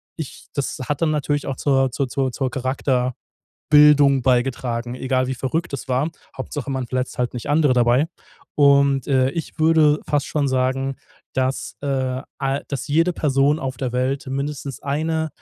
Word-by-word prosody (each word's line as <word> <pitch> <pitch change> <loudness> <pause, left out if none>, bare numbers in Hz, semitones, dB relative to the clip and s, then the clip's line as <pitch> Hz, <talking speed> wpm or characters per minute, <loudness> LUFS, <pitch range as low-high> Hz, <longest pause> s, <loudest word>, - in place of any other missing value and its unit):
ich 160 -5 -8
das 140 - -3
hat 145 +1 -2
dann 160 -2 +2
natürlich 145 -1 -1
auch 135 -2 -3
zur 135 -2 +2
zur 135 +2 -1
zur 130 +1 -1
zur 130 +1 -2
Charakterbildung 130 -1 -2 0.9
beigetragen, 120 -1 0
egal 130 0 0
wie 130 - -2
verrückt 145 +6 -2
das 135 -1 -6
war. 130 +4 +1 0.3
Hauptsache 140 +1 -5
man 130 -2 -2
verletzt 130 +1 -3
halt 125 0 -1
nicht 120 +2 -6
andere 145 -3 +3
dabei. 125 +5 +3 0.5
Und, 140 -2 +4
äh, 130 -2 +3
ich 165 +3 -6
würde 155 -2 +4
fast 145 -1 +1
schon 145 -2 0
sagen, 130 +1 0 0.4
dass, 130 +1 -2
äh, 130 -2 -1 0.2
ei 135 0 -1
dass 140 +1 -4
jede 165 +5 +3
Person 145 -1 +2
auf 130 -4 -4
der 130 -1 -3
Welt 130 +3 -1
mindestens 140 0 -4
eine 160 +3 -1
135 Hz, 165 wpm, -21 LUFS, 130-145 Hz, 0.9 s, Und